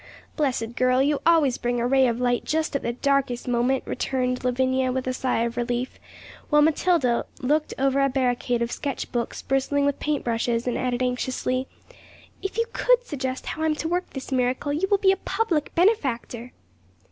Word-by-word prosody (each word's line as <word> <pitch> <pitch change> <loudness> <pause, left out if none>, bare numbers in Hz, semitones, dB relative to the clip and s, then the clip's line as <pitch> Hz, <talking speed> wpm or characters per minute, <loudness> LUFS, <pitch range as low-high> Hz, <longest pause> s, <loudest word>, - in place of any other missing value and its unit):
'Blessed 245 -6 -1
girl! 255 0 +3
you 285 +2 +2
always 310 -7 +4
bring 245 0 -1
a 235 - 0
ray 265 +1 +4
of 235 0 -1
light 245 -1 +1
just 315 -1 -1
at 280 - 0
the 235 - -1
darkest 265 -1 0
moment,' 250 +2 +1
returned 250 -1 -2
Lavinia, 260 +1 +1
with 260 0 -2
a 255 - -1
sigh 255 -2 0
of 235 0 -3
relief, 245 +1 -2 0.5
while 295 -1 +5
Matilda 310 -5 +2 0.2
looked 300 +4 0
over 275 +1 +2
a 275 - +3
barricade 245 -2 0
of 235 - -3
sketch 280 -3 -4
books 240 -1 -3
bristling 270 +1 +1
with 285 -1 0
paint 295 -1 -1
brushes, 230 0 -1
and 245 - -1
added 250 0 -1
anxiously, 255 +1 -1 0.7
'If 390 +2 -4
you 460 - +2
could - - +3
suggest 260 - -4
how 315 - -5
I 320 - +2
am 310 - +1
to 310 - -3
work 355 +2 -1
this 270 0 -8
miracle, 255 +2 0
you 335 +6 0
will 405 - +4
be 385 -1 +4
a 385 - 0
public 380 -7 -1
benefactor.' 255 - 0
260 Hz, 190 wpm, -24 LUFS, 245-295 Hz, 0.7 s, while